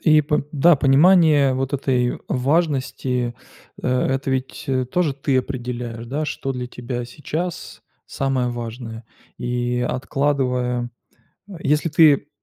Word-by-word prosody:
И 155 -2 +5
по 150 -1 0
да, 155 +3 +5
понимание 145 0 +5
вот 135 +1 -2
этой 130 -3 0
важности, 130 -4 0 0.5
э, - - -1 0.3
это 135 0 -2
ведь, 130 0 -3
э, 130 -2 0
тоже 155 +1 0
ты 135 -1 0
определяешь, 120 -3 -4
да, 145 +6 -2
что 135 -2 -3
для 125 -1 -4
тебя 125 0 -5
сейчас 155 +7 -5 0.2
самое 135 -2 -1
важное. 115 -1 -6 0.3
И 125 0 -1
откладывая, 125 -3 -1 0.6
э, - - -11
если 150 +3 +1
ты 150 -2 +5
130 Hz, 125 wpm, -21 LUFS, 125-145 Hz, 0.6 s, И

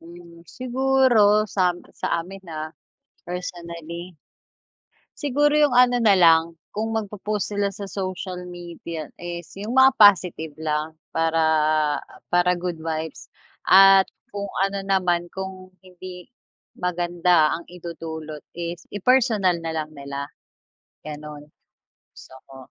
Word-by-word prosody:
Hmm, 170 0 -14
siguro 260 -2 +3 0.3
sam 180 -2 +2 0.2
sa - - -1
amin, 190 +3 -10
ah, 155 0 -4 0.6
personally. 170 -1 -7 1.0
Siguro 290 0 +2
'yung 295 -3 +4
ano 245 0 +5
na 225 -4 +4
lang, 165 -3 +4 0.2
kung 220 +1 -1
magpo-post 210 -2 -3
sila 200 -1 0
sa 200 +1 -7
social 185 -1 -5
media 170 -3 -7
is 175 -2 -7
'yung 210 +4 -5
mga 265 0 +6
positive 180 - +5
lang 155 0 -2 0.2
para, 165 0 0 0.6
ah, - - -18
para 175 0 +3
good 175 -1 -3
vibes 160 0 -5 0.3
at 195 0 +8 0.2
kung 200 0 -5 0.2
ano 195 0 -5
naman 180 -3 +1
kung 190 -1 -7
hindi 180 -1 -11 0.5
maganda 175 -2 +2
ang 170 - -10
idudulot 160 -3 -8
is 170 0 -6
i-personal 210 -4 +3
na 165 - -2
lang 155 -1 -3
nila, 140 0 -6 0.8
gano'n, 150 -1 -8 0.7
gusto - - -15 0.2
ko. 135 - -12
180 Hz, 120 wpm, -23 LUFS, 165-200 Hz, 1.0 s, at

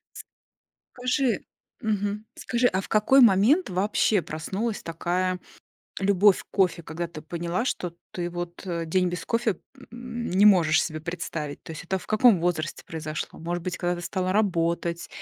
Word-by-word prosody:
С - - -8 0.7
кажи 250 0 +1 0.4
Мгм. 210 -2 -1
Скажи, 245 0 +1
а 190 - 0
в - - -9
какой 215 +6 +4
момент 235 - +5
вообще 200 +2 +2
проснулась 195 +9 -3
такая 180 +2 -1 0.6
любовь 195 0 +4
к - - -32
кофе, 185 -3 +1
когда 165 +2 -5
ты 155 -2 -9
поняла, 170 +5 -2
что 180 -8 -3 0.2
ты 175 -1 -3
вот, 175 +1 -6
э, 170 -2 -2
день 180 +3 +1
без 175 0 -4
кофе, 230 -5 0 0.3
м, 240 0 -6
не 190 +3 +4
можешь 175 -7 +6
себе 155 -1 -5
представить? 160 -3 -5
То - - -8
есть 160 - -8
это 190 +2 -1
в - - -13
каком 215 -2 +5
возрасте 165 -2 -2
произошло? 155 -1 -5
Может 175 +1 -3
быть, 180 - -3
когда 175 0 0
ты 175 - -7
стала 185 +1 -1
работать, 170 -4 0
180 Hz, 165 wpm, -26 LUFS, 170-210 Hz, 0.7 s, можешь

